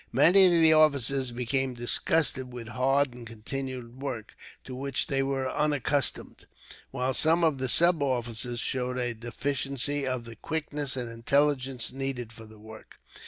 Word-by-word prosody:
Many 180 +9 +7
of - - +4
the 160 -2 +6
officers 140 -4 +3
became 125 +2 -2
disgusted 130 +2 0
with 120 -2 -8
hard 135 +2 +1
and 120 -1 -11
continuous 130 +3 -6
work, 125 -4 -7 0.3
to 130 - -9
which 135 +1 -1
they 135 -2 0
were 135 -1 -1
unaccustomed, 145 -1 -1 0.4
while 130 0 -2
some 165 +4 +3
of 155 -5 +2
the 130 -1 -1
sub 170 +1 +4
officers 120 -2 -2
showed 125 +1 -2
a 120 -1 -1
deficiency 135 +4 -2
of 130 -2 -3
the 115 0 -10
quickness 145 +1 -3
and 125 -2 -3
intelligence 130 0 0
needed 130 -4 -4
for 110 0 -12
the 110 0 -16
work. 110 +1 -13
130 Hz, 155 wpm, -27 LUFS, 120-140 Hz, 0.4 s, Many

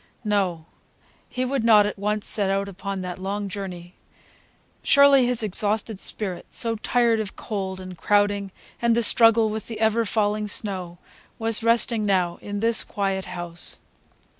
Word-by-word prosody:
No, 190 -6 -1 0.6
he 255 0 -3
would 260 -2 -2
not 215 -3 +6
at 205 -1 -4
once 210 +1 -2
set 205 -3 +2
out 195 +1 -1
upon 195 0 -6
that 180 0 -6
long 200 +2 -4
journey. 185 -3 -7 0.9
Surely, 280 -2 +5
his 245 -2 +3
exhausted 210 +1 -1
spirit, 190 -5 -3
so 230 -1 +1
tired 235 0 +1
of 210 -3 -5
cold 190 -3 -5
and 185 -1 -9
crowding 205 +2 +1 0.3
and 235 -1 +2
the 235 - +1
struggle 225 0 +5
with 220 0 -5
the 225 -2 -7
ever 220 +1 +2
falling 210 -1 -1
snow, 185 -4 -2 0.4
was 225 0 +1
resting 230 -1 +2
now 185 -4 0
in 205 0 -5
this 230 0 +4
quiet 195 -2 -3
house. 175 -2 -3
205 Hz, 155 wpm, -23 LUFS, 190-225 Hz, 0.9 s, not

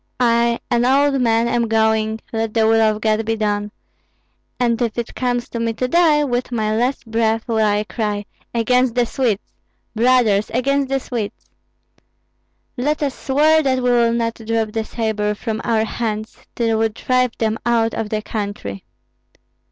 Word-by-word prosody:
I, 235 -1 +2
an 240 0 +3
old 275 +1 +3
man, 230 -1 +2
am 235 -1 +1
going, 220 0 +1
let 225 0 -2
the 225 -1 +3
will 225 0 +4
of 215 -1 +2
God 220 0 +1
be 225 +1 -1
done; 210 -1 -1 0.9
and 240 -1 +1
if 235 -1 -1
it 235 -1 -4
comes 245 -1 -1
to 235 - -5
me 230 0 -1
to 255 +3 -2
die, 315 -1 +4
with 250 -2 -2
my 215 -2 0
last 250 +4 -1
breath 225 0 0
will 225 -2 0
I 210 -1 +2
cry, 210 -2 -3 0.3
'Against 250 +1 +2
the 245 -1 +3
Swedes! 230 -4 -1 0.5
brothers, 225 -3 +3
against 275 +2 +1
the 270 0 +1
Swedes!' 230 -5 -6 1.3
Let 295 +4 0
us 275 -2 -1
swear 305 +5 +3
that 265 -3 +1
we 250 - +3
will 235 -1 +3
not 230 -1 0
drop 225 -1 -1
the 225 0 -2
sabre 215 -2 -1
from 220 0 -4
our 225 -1 +1
hands 215 -1 -4 0.2
till 225 -2 +1
we 225 0 +2
drive 250 +2 0
them 220 -1 -1
out 230 -1 +1
of 220 -2 -3
the 215 0 -2
country." 200 - -5
230 Hz, 170 wpm, -19 LUFS, 220-245 Hz, 1.3 s, will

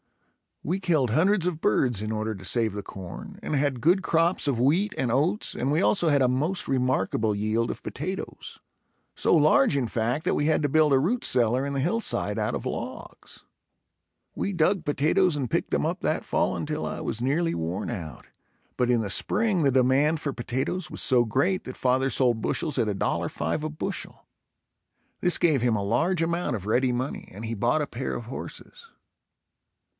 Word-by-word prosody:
We 180 +5 -1
killed 155 - +1
hundreds 180 - +3
of 165 -3 -3
birds 125 -6 +1
in 110 - -3
order 110 0 -2
to 95 -1 -10
save 115 0 0
the 100 0 -5
corn 95 -3 -9
and 150 - -2
had 135 -3 0
good 180 - +3
crops 165 0 +1
of 130 -5 0
wheat 170 - +2
and 125 -3 0
oats 160 - 0
and 135 +3 -1
we 155 +4 +2
also 185 -5 +3
had 140 -2 +3
a - - +4
most 150 +9 0
remarkable 125 -5 0
yield 110 +3 0
of - - -9
potatoes; 185 +8 -6 0.6
so - - +2
large 145 -2 +4
in 125 -4 0
fact, 120 +7 -1
that - - +1
we 145 - 0
had 155 - +2
to 145 - +1
build 155 +1 +3
a 135 - +5
root 225 - 0
cellar 125 +2 +2
in 140 - -3
the 140 - -1
hillside 180 +11 0
out - - -1
of - - -5
logs. - - -7 0.9
We 200 - -2
dug 175 +2 +1
potatoes 155 +4 +2
and 135 -5 -2
picked - - -1
them - - +1
up - - -2
that - - -1
fall - - 0
until - - -3
I - - -4
was 110 - -4
nearly 160 +6 +1
worn 85 +5 -3
out, 85 -9 -7 0.5
but 125 -1 +1
in 120 -2 +3
the 105 - -3
spring 185 - +2
the 140 -3 +3
demand 135 +5 +3
for 140 -2 -3
potatoes 135 +8 -3
was - - -2
so 125 -3 +4
great 145 - 0
that 130 - -8
father 130 +1 +1
sold 120 -3 +2
bushels 150 +2 -1
at 115 - +1
$1.05 95 - -2
a 155 - -2
bushel. 155 - -5 1.0
This 180 - +2
gave 155 -7 +2
him 120 -3 +2
a 100 - -1
large 165 - +1
amount 170 -5 -1
of 100 -3 -6
ready 125 +4 +2
money 125 +3 -4
and 105 +5 -8
he 115 - -3
bought 120 +8 +1
a - - -4
pair 130 +2 -4
of 120 - -6
horses. 460 - -9
135 Hz, 195 wpm, -26 LUFS, 120-165 Hz, 1.0 s, a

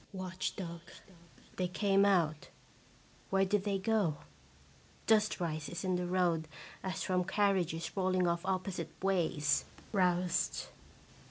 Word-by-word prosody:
Watch 185 0 -3
dog. 170 -3 -6 0.8
They 185 - +1
came 195 +2 +3
out. 165 -6 +2 0.8
Where 195 0 +3
did 200 +1 +1
they 200 -1 +1
go? 195 -6 +1 0.9
Dust 215 -2 +3
rises 165 0 -3
in 185 -1 +1
the 180 0 -1
road 175 -3 +1 0.3
as 190 -1 -3
from 185 -1 +1
car 200 +2 +2
riages 170 -3 -2
rolling 185 -1 +2
off 170 0 0
opposite 185 -3 -2
ways. 170 -6 +2 0.3
(Roused.) 180 -3 +1
185 Hz, 120 wpm, -33 LUFS, 170-195 Hz, 0.9 s, came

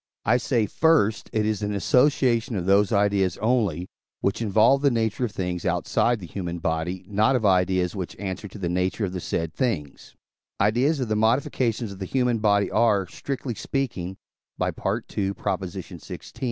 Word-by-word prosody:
I 120 - +4
say, 120 -3 +1
first, 130 -3 +2
it 110 -1 0
is 110 -1 -1
an 105 0 -2
association 125 +1 +2
of 90 -3 -2
those 100 +1 +4
ideas 100 -3 +2
only, 105 -7 0 0.3
which 100 +4 -1
involve 110 +5 +4
the 140 - +4
nature 115 0 0
of 115 - -5
things 90 -3 -3
outside 120 -1 +1
the 95 - -8
human 85 -1 -5
body: 80 +3 -2
not 110 +6 +2
of 115 -4 0
ideas 90 -1 +2
which 95 -3 -5
answer 95 +1 -5
to 100 - -11
the 95 -4 -3
nature 90 +4 0
of 90 - -5
the 90 - -3
said 80 -2 -3
things: 85 - -3 0.4
ideas 125 +9 +2
of 125 - -1
the 110 - 0
modifications 115 0 +1
of 95 - -10
the 95 - -3
human 125 0 +1
body 100 -1 +2
are, 105 -4 +3
strictly 130 +5 -5
speaking 95 -8 -3 0.4
(II. - - +1
xvi.) 95 -3 -4
105 Hz, 165 wpm, -25 LUFS, 95-115 Hz, 0.4 s, I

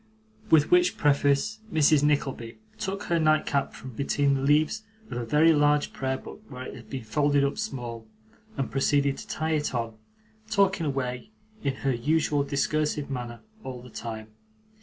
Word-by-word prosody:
With 155 -4 +5
which 180 0 +4
preface, 145 +8 +2
Mrs. 155 -2 +4
Nickleby 135 -5 0 0.2
took 195 +1 -3
her 170 -1 +1
nightcap 155 -3 +1
from 130 - -9
between 140 +3 +1
the 135 - 0
leaves 150 +9 +2 0.3
of 120 - -3
a - - -3
very 155 +6 +5
large 145 0 +2
prayer 130 0 -2
book - - -11
where 130 -2 -7
it - - -7
had - - -12
been 130 -3 -5
folded 145 +4 +2
up 140 +9 -1
small, 120 - -5 0.5
and 135 - -2
proceeded 140 0 +2
to - - -9
tie 160 +1 -2
it 150 -4 0
on: 115 -2 -3 0.5
talking 195 -5 +2
away 130 +1 -3 0.3
in 135 -2 0
her 135 - +3
usual 145 +4 +1
discursive 150 0 -1
manner, 120 -2 -5 0.2
all 125 -2 -7
the 125 - -13
time. 110 -1 -6
140 Hz, 165 wpm, -27 LUFS, 130-155 Hz, 0.5 s, With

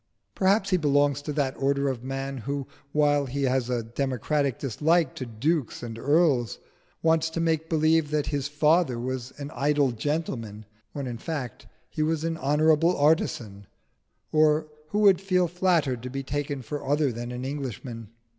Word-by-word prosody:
Perhaps 195 +1 +2
he 185 - +4
belongs 145 -2 +2
to 150 - -4
that 140 -3 -1
order 140 +1 +1
of 130 -3 -3
man 135 0 -4
who, 140 +3 -3 0.3
while 145 -1 +2
he 140 +2 -2
has 130 -2 +1
a 120 -2 -1
democratic 135 +3 -1
dislike 150 +4 +1
to 130 - -6
dukes 130 +4 -1
and 115 -1 -6
earls, 140 - +2 0.5
wants 160 0 +3
to 160 - -4
make 160 -1 0
believe 160 -1 +3
that 150 -1 0
his 145 -2 -2
father 150 -2 +2
was 130 +1 -4
an 145 0 -6
idle 140 0 +2
gentleman, 115 -5 -3 0.3
when 140 -2 -4
in 120 -2 -5
fact 145 -7 -5 0.2
he - - -4
was 155 0 0
an 165 0 -1
honourable 155 +4 +3
artisan, 115 -9 +1 0.6
or 155 0 +3 0.2
who 180 - -3
would 200 -4 +5
feel 185 -2 +2
flattered 170 -8 +1
to 125 - -6
be 135 +1 -4
taken 145 0 -3
for 145 +6 -5
other 145 0 +1
than 120 +1 -5
an 125 +1 -5
Englishman. 125 -5 -5
145 Hz, 165 wpm, -26 LUFS, 130-155 Hz, 0.6 s, would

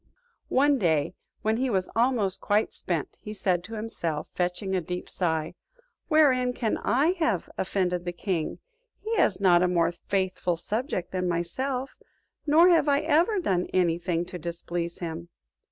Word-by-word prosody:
One 280 +1 +3
day 160 -5 +1 0.3
when 220 +1 +1
he 260 +1 0
was 190 -5 0
almost 230 -5 +2
quite 210 +1 +1
spent, - - -4
he 210 0 -7
said 180 -3 0
to 225 - -7
himself, 170 -8 -4
fetching 180 +2 -1
a 185 - +1
deep 180 +2 -5
sigh, 160 -3 -1 0.5
"Wherein 260 -6 +4
can 230 -3 -1
I 285 +7 +2
have 230 - 0
offended 180 -2 -1
the 175 - -2
king? 175 -2 -2 0.4
He 450 +2 -3
has 190 - +3
not 180 -3 +5
a 180 - +3
more 170 -2 +2
faithful 185 -1 -1
subject 215 - -3
than 185 -1 -1
myself; 250 +11 -2 0.5
nor 325 +5 +6
have 330 -4 +4
I 280 +1 +3
ever 330 +7 +2
done 185 - 0
any 170 -2 +2
thing 175 -1 -1
to 180 0 -8
displease 170 +1 -4
him." 170 0 -6
190 Hz, 160 wpm, -27 LUFS, 175-255 Hz, 0.5 s, nor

